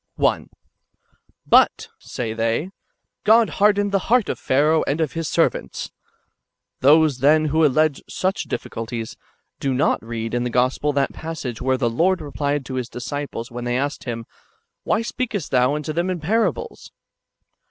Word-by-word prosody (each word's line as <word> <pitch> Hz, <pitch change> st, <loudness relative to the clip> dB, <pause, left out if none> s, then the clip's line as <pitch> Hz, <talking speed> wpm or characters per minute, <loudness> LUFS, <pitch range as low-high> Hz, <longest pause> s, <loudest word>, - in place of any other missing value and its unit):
1. -, -, 0 dB, 0.5 s
" -, -, -41 dB
But," -, -, +4 dB
say 115 Hz, -3 st, -5 dB
they, 115 Hz, +4 st, 0 dB
^' 185 Hz, -, -10 dB, 0.5 s
God 225 Hz, +1 st, +5 dB
hardened 205 Hz, -1 st, +4 dB
the 195 Hz, -, +2 dB
heart 245 Hz, -2 st, +3 dB
of -, -, -3 dB
Pharaoh 150 Hz, +4 st, +2 dB
and 145 Hz, +4 st, 0 dB
of 160 Hz, -4 st, 0 dB
his 165 Hz, -2 st, -3 dB
servants." 65 Hz, -, 0 dB
^ -, -, -41 dB, 0.9 s
Those, 150 Hz, 0 st, +4 dB
then, 155 Hz, +4 st, +4 dB
who 155 Hz, +2 st, +2 dB
allege 155 Hz, 0 st, +2 dB
such 190 Hz, +2 st, -2 dB
diffi -, -, -4 dB
culties, 115 Hz, 0 st, -5 dB, 0.4 s
do 135 Hz, -2 st, -1 dB
not 135 Hz, -2 st, +1 dB
read 115 Hz, 0 st, -5 dB
in 120 Hz, 0 st, 0 dB
the 125 Hz, -, -1 dB
Gospel 125 Hz, +4 st, +1 dB
that 140 Hz, -1 st, 0 dB
passage 150 Hz, -8 st, -6 dB
where 130 Hz, 0 st, +1 dB
the 125 Hz, -2 st, 0 dB
Lord 175 Hz, +11 st, +2 dB
replied 145 Hz, -2 st, -2 dB
to 130 Hz, -, -7 dB
the -, -, -5 dB
disciples, 125 Hz, 0 st, -5 dB
when 120 Hz, 0 st, -6 dB
they 120 Hz, 0 st, 0 dB
asked 140 Hz, +2 st, -3 dB
Him, 115 Hz, -2 st, -4 dB, 0.3 s
" -, -, -46 dB
Why 220 Hz, +1 st, +1 dB
speakest 230 Hz, -, -3 dB
Thou 130 Hz, +2 st, +3 dB
unto 150 Hz, +1 st, -4 dB
them 170 Hz, +3 st, -1 dB
in 180 Hz, -2 st, -2 dB
parables?" 225 Hz, -, -1 dB
145 Hz, 175 wpm, -22 LUFS, 125-165 Hz, 0.9 s, God